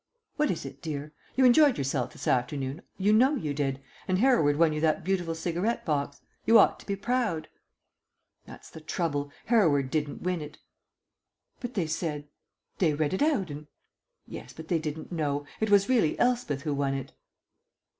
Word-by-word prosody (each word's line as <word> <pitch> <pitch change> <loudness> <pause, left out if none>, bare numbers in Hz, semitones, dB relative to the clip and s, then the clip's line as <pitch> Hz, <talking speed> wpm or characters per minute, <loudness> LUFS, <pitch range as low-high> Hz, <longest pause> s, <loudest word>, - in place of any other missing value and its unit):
"What 300 0 +1
is 170 - -2
it, - - -9
dear? 150 -1 -5 0.2
You 260 - +4
enjoyed 275 +2 +6
yourself 130 -2 -1
this - - -8
afternoon, 135 +4 -1 0.2
you 200 +2 +3
know 260 +7 +5
you 155 - -2
did, 135 -2 -1 0.3
and 185 - +1
Hereward 195 - +3
won 160 -1 +4
you 150 - -2
that 155 -1 +1
beautiful 180 -3 -1
cigarette 175 +7 -2
box. 145 -2 -2 0.2
You 230 - +6
ought 210 - +5
to - - -15
be 200 - -1
proud." 210 -5 -1 1.0
"That's - - -13
the 160 - -10
trouble. 145 -3 -2 0.2
Hereward 155 - +3
didn't 150 -2 -2
win 180 -2 -1
it." 150 0 -9 1.0
"But 245 -1 -6
they 185 -5 +1
said 155 -2 -3 0.5
they 160 -5 +3
read 150 +1 0
it 190 - -1
out, 280 - +1
and 145 +1 -8 0.3
" - - -62 0.2
"Yes, - - -9
but 160 0 -11
they 170 - +2
didn't 155 +1 -6
know. 145 -4 -1
It 220 - 0
was 200 -1 +5
really 230 -12 +2
Elspeth 235 - 0
who 150 -3 -1
won 140 -1 0
it." 135 - -6
160 Hz, 180 wpm, -28 LUFS, 145-205 Hz, 1.0 s, enjoyed